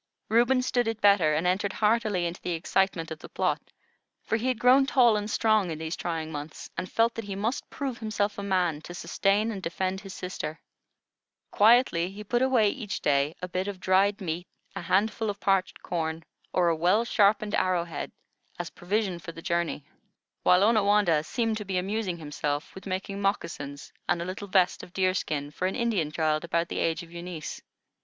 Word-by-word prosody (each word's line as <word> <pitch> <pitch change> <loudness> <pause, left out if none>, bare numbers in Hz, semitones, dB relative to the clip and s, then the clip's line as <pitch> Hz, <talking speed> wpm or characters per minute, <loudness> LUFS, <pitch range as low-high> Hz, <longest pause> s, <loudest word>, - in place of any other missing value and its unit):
Reuben 240 +3 +4
stood 245 -2 +1
it 225 -1 -2
better, 200 -8 +5
and 160 +3 0
entered 190 +2 +1
heartily 210 -4 +1
into 170 +1 -4
the 180 - -2
excitement 165 0 0
of 160 - -6
the - - -11
plot; - - 0 0.6
for - - 0
he 230 +3 -1
had 255 -2 +1
grown 255 +3 +5
tall 245 -5 +5
and 210 0 -2
strong 215 -4 +2
in 160 - -4
these 160 +1 -4
trying 160 -2 -3
months, 150 0 -7
and 185 - -4
felt 230 +1 +3
that 230 - -6
he 200 -1 -5
must 220 +6 -2
prove 270 -4 -4
himself 210 -2 -1
a - - -3
man 180 -6 0
to 175 +2 -9
sustain 205 +5 +1
and 200 -3 -5
defend 185 +2 -2
his 195 -2 -9
sister. 165 -4 -5 0.9
Quietly 210 -6 +4
he 205 +2 -9
put 240 +4 0
away 255 -5 +4
each 215 -7 -5
day 140 +2 +2
a - - -1
bit 185 +2 -2
of 200 -2 -5
dried 195 +3 +3
meat, 175 0 -3 0.3
a - - -4
handful 210 +5 +1
of 200 -1 -4
parched 195 -2 0
corn, 160 -1 -2 0.3
or 175 -1 +3
a 165 - +2
well 180 +8 +3
sharpened 210 -1 +3
arrowhead, 170 -4 0 0.5
as - - -5
provision 190 -1 -1
for 165 - -8
the - - -10
journey; 170 -4 -1 0.6
while 180 +2 +5
Onawandah 205 -7 +4
seemed 225 +4 -1
to 210 - -5
be 190 -1 -2
amusing 190 -1 -1
himself 145 -1 -3
with 190 - -10
making 195 +1 -3
moccasins 155 -8 -3 0.2
and 175 - +2
a 170 - -3
little 190 +3 -5
vest 185 -2 +2
of 175 - -12
deer 185 -1 +2
skin 145 -6 -2
for 180 +4 -1
an 190 - -3
Indian 220 -11 0
child 155 0 0
about 170 0 0
the - - -3
age 165 +2 0
of 165 - -14
Eunice. 170 -2 -6
190 Hz, 195 wpm, -27 LUFS, 170-215 Hz, 0.9 s, better